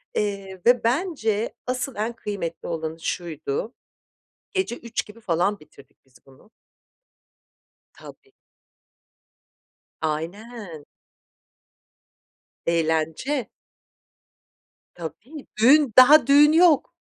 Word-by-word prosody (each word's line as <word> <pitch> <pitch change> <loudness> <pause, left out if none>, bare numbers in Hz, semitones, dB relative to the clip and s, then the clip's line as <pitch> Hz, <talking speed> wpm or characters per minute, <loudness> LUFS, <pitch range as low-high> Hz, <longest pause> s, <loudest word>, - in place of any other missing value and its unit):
eee, 195 -2 -3
ve 245 0 +4
bence 235 - -1
asıl 255 +1 -3
en 220 +3 -2
kıymetli 200 -7 -6
olanı 160 -1 -4
şuydu; 165 - -4 0.8
gece 380 - -2
03.00 235 -1 -4
gibi 210 +2 -14
falan 185 +2 0
bitirdik 150 -2 -19
biz 130 - -25
bunu. 135 +11 -21 1.4
Tabii. 410 -2 -15 1.7
Aynen. 170 +2 -5 1.8
Eğlence. 165 - 0 1.5
Tabii, 215 - -9
düğün, 270 0 +5
daha 265 +1 +8
düğün 290 +2 +6
yok. 330 -3 +4
215 Hz, 80 wpm, -23 LUFS, 165-255 Hz, 1.8 s, daha